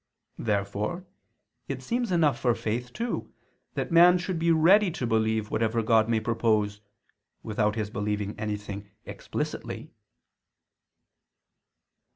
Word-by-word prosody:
Therefore 105 - -2 0.6
it - - -5
seems 240 -2 -1
enough 155 -7 +3
for 120 -2 +2
faith, 120 +3 -3
too, 235 - -4 0.4
that - - -2
man 175 +2 +7
should 180 -1 -3
be 170 +1 +1
ready 180 +5 +5
to 160 -7 -3
believe 110 -1 0
whatever 115 0 +1
God 110 0 +3
may 115 -1 +2
propose, 110 -2 0 0.6
without 105 -1 0
his 105 -2 -3
believing 105 -1 -2
anything 105 -1 -5 0.2
explicitly. - - -5
115 Hz, 115 wpm, -27 LUFS, 105-165 Hz, 0.6 s, man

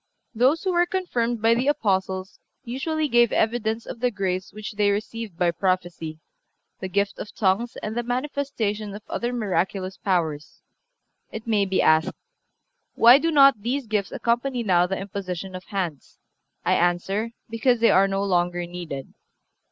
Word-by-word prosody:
Those 260 +8 +2
who 375 -2 0
were 350 0 +3
confirmed 240 - -1
by 225 +1 +5
the 245 +3 0
Apostles 190 -7 0 0.2
usually 300 +5 -2
gave 240 -3 +4
evidence 225 0 0
of - - -8
the 250 +1 +2
grace 190 -4 -3
which 215 0 -7
they 205 0 +2
received 210 -1 -3
by 175 -1 +2
prophecy, 175 -3 -2 0.6
the 190 - -4
gift 200 +2 -1
of 210 - -8
tongues 210 +4 +1
and 215 +1 -4
the 240 - 0
manifestation 245 -5 -2
of 210 - -9
other 240 +1 -2
miraculous 195 -4 -2
powers. 160 -6 -2 0.7
It 220 0 -7
may 215 -3 +2
be 190 0 +1
asked: 155 0 +3 0.8
Why 240 +4 +8
do 330 - 0
not 275 -7 +6
these 255 +5 -2
gifts 210 -3 -1
accompany 240 +1 -1
now 180 -4 +3
the 190 +1 -2
imposition 190 -1 -5
of 185 0 -8
hands? 175 -8 -4 0.5
I - - +3
answer: 195 +6 0
Because 230 +2 +1
they 230 - +5
are 195 +1 +5
no 195 0 -1
longer 175 -2 0
needed. 170 -6 -7
210 Hz, 160 wpm, -24 LUFS, 185-240 Hz, 0.8 s, Why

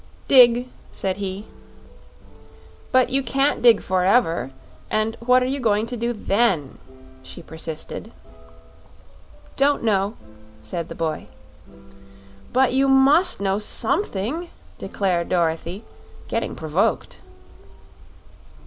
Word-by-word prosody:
"Dig," 245 -2 +6 0.2
said 190 -1 -3
he. 200 +1 -5 1.5
"But 255 -1 +3
you 270 +1 +2
can't 275 +3 0
dig 235 -3 +5
forever; 185 - +1 0.4
and 215 +1 -1
what 250 +2 +3
are - - 0
you 270 +2 -2
going 215 -3 +1
to 245 +2 -5
do 235 +1 -2
then?" 200 - 0 0.4
she - - -11
persisted. 160 -1 -6 1.5
"Don't 280 -1 +2
know," 205 -1 0 0.4
said 170 -2 -6
the - - -8
boy. 160 -2 -3 1.2
"But 255 0 +2
you 270 +1 +2
MUST 275 - +4
know 195 0 0
SOMETHING," 300 - -1 0.3
declared 180 -4 -2
Dorothy, 175 +3 -1 0.4
getting - - -3
provoked. 160 - -1
215 Hz, 105 wpm, -22 LUFS, 185-255 Hz, 1.5 s, Dig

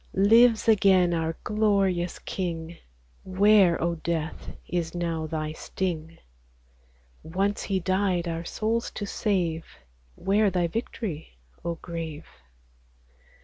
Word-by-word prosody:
Lives 225 +4 +5
again 190 -5 +5
our 165 -1 -1
glorious 195 -5 +1
King: 170 -3 -4 0.5
Where, 190 -2 +4
O 170 +1 0
death! 160 -1 -3 0.2
is 170 -1 -2
now 165 -2 -2
thy 155 -1 -3
sting? 165 -1 -4 1.0
Once 195 +5 -1
he 195 -2 -1
died 185 -1 0
our 165 0 -3
souls 225 +6 -1
to 205 - -3
save: 180 -6 -1 0.5
Where 205 +2 +2
thy 180 -2 0
victory, 170 - -5 0.3
O 170 0 -2
grave 165 -2 -6
175 Hz, 105 wpm, -26 LUFS, 165-200 Hz, 1.0 s, Lives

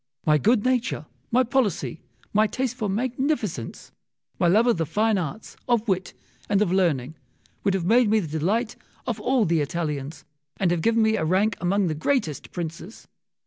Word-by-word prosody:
My 150 -1 +4
good 220 - +2
nature, 250 -10 0 0.3
my 255 +2 +4
policy, 215 - -1 0.3
my 215 +1 +4
taste 255 +1 -2
for 220 -5 -2
magnificence, 235 - -2 0.5
my 175 - +3
love 210 +7 +4
of 240 -6 +3
the 165 - 0
fine 215 +4 +1
arts, 180 +6 -6
of 235 -2 +1
wit, 185 -2 -1 0.3
and 200 -1 +3
of 205 -4 +1
learning, 160 -8 +1 0.5
would 195 -1 +2
have 180 -3 -2
made 230 +3 +4
me 220 +1 +4
the 160 -4 -3
delight 220 +8 0 0.3
of 230 -3 -2
all 250 -1 +2
the 165 -2 +2
Italians, 150 -2 -4 0.3
and 185 -3 +1
have 175 -2 0
given 230 +4 +3
me 220 0 +2
a 190 - -1
rank 190 +6 +2
among 195 +3 +2
the 160 - 0
greatest 160 - -1
princes. 170 +4 -7
200 Hz, 180 wpm, -24 LUFS, 165-230 Hz, 0.5 s, My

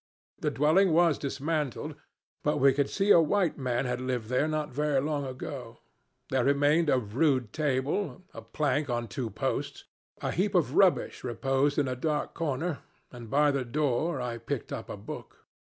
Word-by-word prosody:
The - - 0
dwelling 160 +5 +3
was 165 -2 +4
dismantled; 145 -1 -2 0.5
but 150 0 +1
we 140 -1 +5
could 140 0 0
see 200 +1 +2
a 170 - +8
white 175 0 +1
man 125 -1 -1
had 125 0 -2
lived 125 -4 -2
there 130 +4 +2
not 155 -2 -2
very 150 0 +1
long 145 0 -1
ago. 130 -2 -7 0.5
There 130 -2 +2
remained 145 +4 +3
a 130 - +4
rude 125 +1 0
table 150 +6 -1
a 115 - -8
plank 145 +5 -1
on 120 -1 -1
two 110 +4 -4
posts; - - -3 0.4
a - - -2
heap 200 +3 0
of 145 -7 +2
rubbish 190 0 +3
reposed 135 +3 0
in 145 - +2
a 130 - -2
dark 150 +3 -2
corner, 160 0 -2 0.3
and 120 -3 -10
by 145 +3 +4
the 140 -2 -1
door 145 +4 0
I 120 -2 -3
picked 115 - -4
up - - -6
a - - -5
book. - - -9
140 Hz, 175 wpm, -29 LUFS, 125-155 Hz, 0.5 s, a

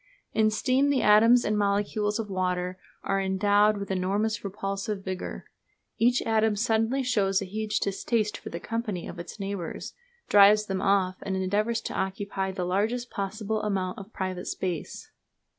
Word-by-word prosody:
In 215 0 +3
steam 255 +5 +2
the 275 -3 +2
atoms 225 +4 +6
and 210 - +1
molecules 205 +1 0
of 225 -2 -3
water 185 -1 -2 0.2
are 195 0 0
endowed 205 +2 +3
with 200 -1 -5
enormous 205 +3 0
repulsive 195 +1 -4
vigour. 185 -1 -5 0.5
Each 245 +2 +3
atom 220 -1 +2
suddenly 225 +4 +1
shows 200 -6 +2
a 195 - -4
huge 215 +2 -2
distaste 210 +2 -1
for - - -8
the 170 - -5
company 215 -4 -3
of - - -8
its 175 +5 -8
neighbours, 195 -3 -5 0.3
drives 210 +1 +6
them 190 -2 -2
off, 195 -2 +2
and 195 - -3
endeavours 210 +5 0
to - - -5
occupy 190 0 -2
the 185 -1 -3
largest 220 +7 -1
possible 210 +2 -3
amount 190 -3 -2
of 200 +2 -11
private 185 -3 -4
space. 180 -5 -4
205 Hz, 160 wpm, -27 LUFS, 190-220 Hz, 0.5 s, atoms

